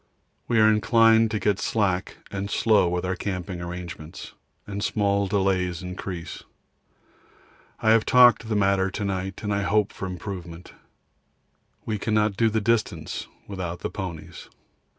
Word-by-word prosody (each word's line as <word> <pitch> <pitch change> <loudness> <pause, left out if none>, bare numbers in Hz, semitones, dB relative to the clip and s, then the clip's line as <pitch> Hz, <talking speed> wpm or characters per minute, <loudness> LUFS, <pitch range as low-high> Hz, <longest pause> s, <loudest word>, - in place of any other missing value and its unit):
We 115 -2 +2
are 110 - +6
inclined 115 +1 +4
to 110 - -1
get 100 -2 +1
slack 95 -5 -1
and 100 0 -4
slow 105 -5 +3
with 90 +1 -2
our 95 +1 -1
camping 90 -1 -4
arrangements, 85 -2 -8 0.3
and 100 0 -5
small 100 -1 +1
delays 95 -3 0
increase. 90 -2 -6 1.4
I 110 - +4
have 115 -1 +5
talked 125 -2 +6
of 115 - -10
the 110 - 0
matter 95 -1 +2
to 100 +2 -4
night 95 0 -3
and 105 -1 -1
hope 100 +1 +1
for 95 - -5
improvement. 90 -2 -7 1.1
We 110 -2 -2
cannot 105 -1 +1
do 115 +2 +3
distance 105 -7 -1 0.2
without 90 -3 -5
the - - -3
ponies. 90 -6 -7
100 Hz, 140 wpm, -25 LUFS, 90-105 Hz, 1.4 s, are